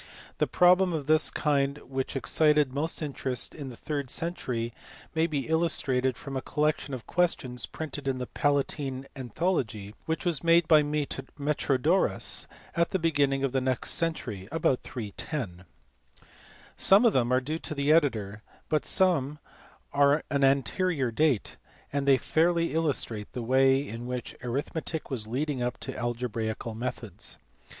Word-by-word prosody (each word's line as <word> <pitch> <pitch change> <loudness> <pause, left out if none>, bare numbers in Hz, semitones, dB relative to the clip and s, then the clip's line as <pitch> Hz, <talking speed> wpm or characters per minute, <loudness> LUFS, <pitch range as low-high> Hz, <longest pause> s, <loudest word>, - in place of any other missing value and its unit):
The - - +2
problems 180 0 +4
of 150 -3 -3
this 155 +1 +4
kind 140 -2 +1
which 130 +1 -4
excited 150 0 +3
most 155 +3 -2
interest 135 -3 -3
in 140 -4 -7
the 125 - -9
third 145 -4 -3
century 125 -9 -2 0.4
may 160 0 +2
be 145 -4 -2
illus 160 +1 +2
trated 130 -1 0
from 135 -1 -7
a 130 - -1
collection 150 -2 -1
of 120 - -9
questions, 130 - 0
printed 145 0 -6
in 135 -1 0
the 125 - -3
Palatine 140 -1 -1
Anthology, 120 - -2
which 160 +3 -2
was 170 -4 0
made 165 0 +5
by 155 -2 +7
Metrodorus 145 -2 0 0.3
at 170 0 +2
the 190 - 0
beginning 145 -5 +1
of 135 - +1
the 130 0 +1
next 130 -2 -1
century, 120 - -2
about 155 -5 +1
310. 105 - -5 1.1
Some 200 +5 +5
of 225 - +5
them 120 -1 +2
are 130 - +4
due 155 +5 -4
to 155 - -6
the 140 +1 +2
editor, 110 -10 +2 0.3
but 155 - +1
some 160 -7 +2 0.6
are 140 0 +5
of 155 - -4
an 140 -1 +1
anterior 135 +1 +2
date, 140 -2 +1 0.4
and 140 -1 -1
they 135 -1 +6
fairly 170 +3 +1
illustrate 140 -9 -1
the 125 - -4
way 135 +3 +3
in 115 +2 -6
which 125 -1 -5
arithmetic 145 +5 -3
was 110 -5 0
leading 135 +3 -2
up 125 0 -1
to - - -5
algebraical 115 -2 -3
methods. 120 +3 -5
140 Hz, 155 wpm, -28 LUFS, 125-155 Hz, 1.1 s, by